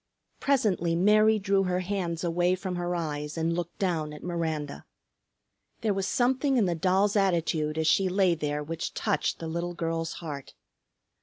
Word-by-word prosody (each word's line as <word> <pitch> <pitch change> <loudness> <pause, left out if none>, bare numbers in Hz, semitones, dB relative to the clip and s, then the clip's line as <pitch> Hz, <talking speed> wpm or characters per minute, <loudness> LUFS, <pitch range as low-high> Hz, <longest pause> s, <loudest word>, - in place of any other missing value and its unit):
Presently 205 -11 +1
Mary 215 +4 +5
drew 195 -1 +1
her 180 0 0
hands 180 -3 -2
away 175 +1 +2
from 185 0 -4
her 175 0 -2
eyes 150 -2 -3
and 165 +1 0
looked 175 0 -4
down 160 -6 -1
at 150 - -10
Miranda. 160 -4 -3 1.0
There 220 -3 +1
was 195 0 -1
something 260 +2 +2
in 220 - +4
the 175 - +1
doll's 190 +5 +2
attitude 165 -5 +1
as 160 - 0
she 190 +4 +3
lay 185 -1 +3
there 150 -2 -2
which 165 +2 -5
touched 150 - 0
the 165 - -6
little 170 +2 -3
girl's 165 0 -2
heart. 145 -5 -7
175 Hz, 165 wpm, -28 LUFS, 160-195 Hz, 1.0 s, Mary